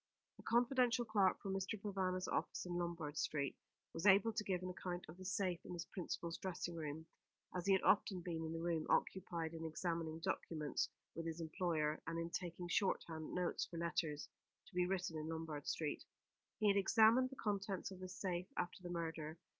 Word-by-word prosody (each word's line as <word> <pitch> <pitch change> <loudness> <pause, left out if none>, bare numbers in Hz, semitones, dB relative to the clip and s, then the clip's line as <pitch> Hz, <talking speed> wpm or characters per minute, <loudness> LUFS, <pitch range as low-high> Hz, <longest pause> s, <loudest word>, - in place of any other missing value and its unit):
A - - -8
confidential 240 0 +3
clerk 205 -4 +4
from 195 - -3
Mr. 195 +2 -1
Provana's 190 -2 -1
office - - -1
in 180 - -3
Lombard 170 -4 -2
Street 140 -3 0 0.4
was 165 +5 +1
able 205 +3 +7
to 215 - 0
give 185 -3 0
an 185 - -2
account 180 0 -4
of 155 - -9
the 185 - -9
safe 185 -2 0
in - - -6
his 170 -2 -4
principal's 170 -3 -4
dressing 175 -2 -3
room, 155 0 -4 0.5
as 180 +1 -2
he 195 - +7
had 190 - +3
often 195 -3 +4
been 165 -2 -2
in 160 - -3
the 165 0 -3
room, 165 -2 0
occupied 170 -3 +1
in 165 0 -5
examining 165 0 -1
documents 155 -2 -1 0.2
with 165 0 -4
his 165 0 -3
employer, 160 -2 0
and 165 0 -1
in 165 0 -2
taking 175 0 -3
shorthand 165 -3 0
notes 180 -1 0
for 170 - -7
letters 160 -3 -1 0.4
to - - -18
be 180 0 +3
written 180 -4 -1
in 155 - -4
Lombard 160 -3 -4
Street. 155 -2 -1 0.5
He 215 - +3
had 200 0 +5
examined 225 +5 +6
the 270 - -9
contents 200 -4 -1
of 190 - -8
this 185 0 -6
safe 180 -2 -1
after 180 +1 -2
the 175 - -6
murder. 165 -2 -3
175 Hz, 195 wpm, -40 LUFS, 165-190 Hz, 0.5 s, able